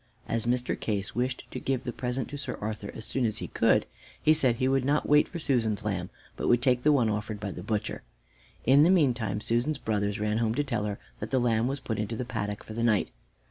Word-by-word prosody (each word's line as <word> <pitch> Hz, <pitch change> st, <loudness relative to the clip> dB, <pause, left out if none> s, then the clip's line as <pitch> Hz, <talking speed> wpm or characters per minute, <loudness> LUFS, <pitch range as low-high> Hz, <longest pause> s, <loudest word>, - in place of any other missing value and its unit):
As 115 Hz, 0 st, -1 dB
Mr. 125 Hz, 0 st, +1 dB
Case 100 Hz, -3 st, -2 dB
wished 125 Hz, +2 st, -2 dB
to -, -, -4 dB
give 130 Hz, -2 st, -1 dB
the 120 Hz, -, -4 dB
present 125 Hz, +1 st, -2 dB
to 145 Hz, -, -6 dB
Sir 125 Hz, -3 st, -4 dB
Arthur 105 Hz, -1 st, -4 dB
as -, -, -4 dB
soon 130 Hz, -, -1 dB
as 110 Hz, -3 st, +1 dB
he -, -, -5 dB
could, -, -, +3 dB, 0.3 s
he 155 Hz, -, +5 dB
said 130 Hz, -6 st, +3 dB
he 130 Hz, +2 st, 0 dB
would 135 Hz, -1 st, +2 dB
not 145 Hz, +3 st, +1 dB
wait 150 Hz, 0 st, +5 dB
for 175 Hz, -, -6 dB
Susan's 115 Hz, -9 st, 0 dB
lamb, 95 Hz, -4 st, -2 dB, 0.3 s
but -, -, -3 dB
would 120 Hz, 0 st, +4 dB
take 125 Hz, -2 st, +3 dB
the 150 Hz, -, +4 dB
one 130 Hz, -6 st, +4 dB
offered 105 Hz, 0 st, -2 dB
by 100 Hz, -1 st, -4 dB
the 90 Hz, -, -7 dB
butcher. 105 Hz, +2 st, -2 dB, 0.6 s
In 135 Hz, +4 st, +6 dB
the 160 Hz, -, +6 dB
meantime 125 Hz, -, +2 dB
Susan's 120 Hz, +7 st, 0 dB
brothers 105 Hz, -3 st, -1 dB
ran 105 Hz, +1 st, 0 dB
home 115 Hz, -1 st, +1 dB
to 145 Hz, -, +1 dB
tell 120 Hz, -7 st, -2 dB
her 100 Hz, -1 st, -3 dB, 0.2 s
that -, -, -5 dB
the 135 Hz, -, +1 dB
lamb 115 Hz, -1 st, +2 dB
was 135 Hz, +2 st, -2 dB
put 110 Hz, -5 st, -3 dB
into 110 Hz, +2 st, -2 dB
the 125 Hz, -, -3 dB
paddock 105 Hz, -3 st, -4 dB
for 110 Hz, -, -9 dB
the 115 Hz, -, -3 dB
night. 110 Hz, -4 st, +2 dB
120 Hz, 245 wpm, -28 LUFS, 105-130 Hz, 0.6 s, In